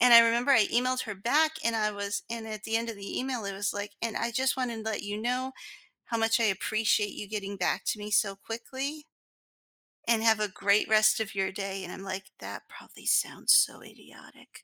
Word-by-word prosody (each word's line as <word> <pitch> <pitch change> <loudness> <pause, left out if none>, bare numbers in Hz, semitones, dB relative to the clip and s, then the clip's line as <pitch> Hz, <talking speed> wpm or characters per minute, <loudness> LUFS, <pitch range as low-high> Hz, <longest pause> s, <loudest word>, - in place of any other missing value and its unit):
And 245 0 +6
I 235 - +12
remember 235 +3 +3
I 225 -7 +6
emailed 255 +2 +1
her 210 -3 -5
back, 295 +11 +2
and 230 0 +1
I 215 -1 +1
was 200 0 -3
and 230 -1 -5
at 215 -1 -7
the 225 0 0
end 230 0 -2
of 220 - -8
the 200 0 -5
email, 255 -4 -3
it 200 - -3
was 200 +1 -1
like, 205 0 -5
"And 230 -2 -2
I 235 0 -1
just 260 +2 +1
wanted 250 -3 -2
to 220 - -1
let 215 - -3
you 205 0 -4
know 250 +3 -1 0.5
how 230 - -2
much 225 +1 +2
I - - +3
appreciate 210 +1 +1
you 205 - -7
getting 200 -2 -4
back 180 - 0
to - - 0
me 210 0 -6
so 200 -2 +2
quickly" 265 +8 -5 1.1
"and 225 -1 +3
have 220 -1 +4
a 210 - +1
great 200 +2 +2
rest 215 0 +5
of 210 -2 -4
your 190 -1 0
day," 195 -1 -5
and 180 - -7
I'm - - -8
like, 190 0 -6
"That - - -8
probably - - -14
sounds - - +3
so - - +4
idiotic." - - -16
S - - -15
220 Hz, 230 wpm, -29 LUFS, 205-235 Hz, 1.1 s, I